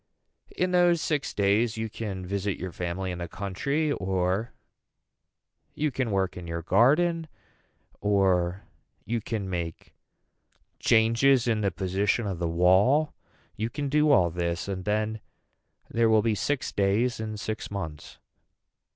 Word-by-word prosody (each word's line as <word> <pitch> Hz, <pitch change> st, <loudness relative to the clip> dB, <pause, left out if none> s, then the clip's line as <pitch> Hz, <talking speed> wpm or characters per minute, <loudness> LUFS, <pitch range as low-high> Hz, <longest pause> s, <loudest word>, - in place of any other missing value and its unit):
In 180 Hz, 0 st, +1 dB
those 175 Hz, -1 st, +4 dB
six 150 Hz, -3 st, -1 dB
days 105 Hz, +3 st, +1 dB
you 110 Hz, 0 st, -2 dB
can 100 Hz, -4 st, -5 dB
visit 100 Hz, 0 st, -2 dB
your 95 Hz, 0 st, -5 dB
family 90 Hz, +2 st, -3 dB
in 90 Hz, -, -5 dB
the 85 Hz, -, -4 dB
country 140 Hz, -, -2 dB
or 95 Hz, 0 st, -1 dB, 1.2 s
you 150 Hz, -1 st, 0 dB
can 130 Hz, -2 st, -1 dB
work 95 Hz, -2 st, 0 dB
in 90 Hz, -1 st, -8 dB
your 85 Hz, 0 st, -4 dB
garden 155 Hz, -, +3 dB, 0.7 s
or 95 Hz, -2 st, +1 dB, 0.4 s
you 115 Hz, 0 st, -1 dB
can 105 Hz, -2 st, -3 dB
make 85 Hz, -3 st, -5 dB, 0.9 s
changes 115 Hz, +3 st, +4 dB
in 110 Hz, -2 st, +1 dB
the 100 Hz, -, +2 dB
position 95 Hz, +4 st, 0 dB
of 95 Hz, -4 st, -3 dB
the 85 Hz, -1 st, -1 dB
wall 95 Hz, -, +3 dB, 0.4 s
you 110 Hz, +2 st, -2 dB
can 145 Hz, +3 st, -3 dB
do 150 Hz, +1 st, +3 dB
all 90 Hz, -, +4 dB
this 85 Hz, +1 st, -2 dB
and 95 Hz, -2 st, -4 dB
then 110 Hz, +1 st, -1 dB, 0.7 s
there 115 Hz, -1 st, +2 dB
will 110 Hz, -1 st, +4 dB
be 115 Hz, -1 st, +2 dB
six 125 Hz, +7 st, -1 dB
days 105 Hz, +5 st, +1 dB
in 110 Hz, -1 st, -4 dB
six 110 Hz, +2 st, -4 dB
months. 80 Hz, -7 st, -6 dB
105 Hz, 140 wpm, -27 LUFS, 95-120 Hz, 1.2 s, those